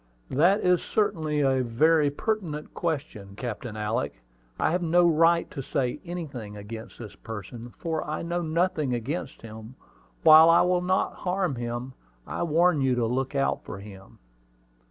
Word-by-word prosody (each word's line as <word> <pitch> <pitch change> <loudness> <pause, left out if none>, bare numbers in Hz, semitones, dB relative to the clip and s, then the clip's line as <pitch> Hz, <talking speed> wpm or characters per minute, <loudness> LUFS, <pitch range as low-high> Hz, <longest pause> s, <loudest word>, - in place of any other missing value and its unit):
"That 175 +10 +3
is 180 -1 +3
certainly 155 -8 0
a 135 -2 +2
very 145 +6 +3
pertinent 160 -2 -3
question, 135 - -4
Captain 115 -1 -6
Alick. 105 - -3 0.4
I - - +2
have 180 +2 0
no 175 +1 +3
right 165 +1 +3
to 135 - -5
say 130 +1 -2
anything 140 - -7
against 110 +2 -9
this 110 -4 -9
person, 115 +2 -9
for 160 -2 -2
I 155 +2 -4
know 170 +1 -2
nothing 160 -5 0
against 130 +7 -5
him. 110 +2 -10 0.5
While 160 +1 +9
I 165 - +6
will 180 0 +2
not 185 +1 0
harm 185 -3 -1
him, 120 +1 -5 0.3
I - - -5
warn 170 -1 +3
you 130 -1 +2
to 120 -1 +1
look 130 +4 -2
out 135 - 0
for 100 - -7
him." 100 -1 -12
145 Hz, 155 wpm, -26 LUFS, 120-170 Hz, 0.5 s, While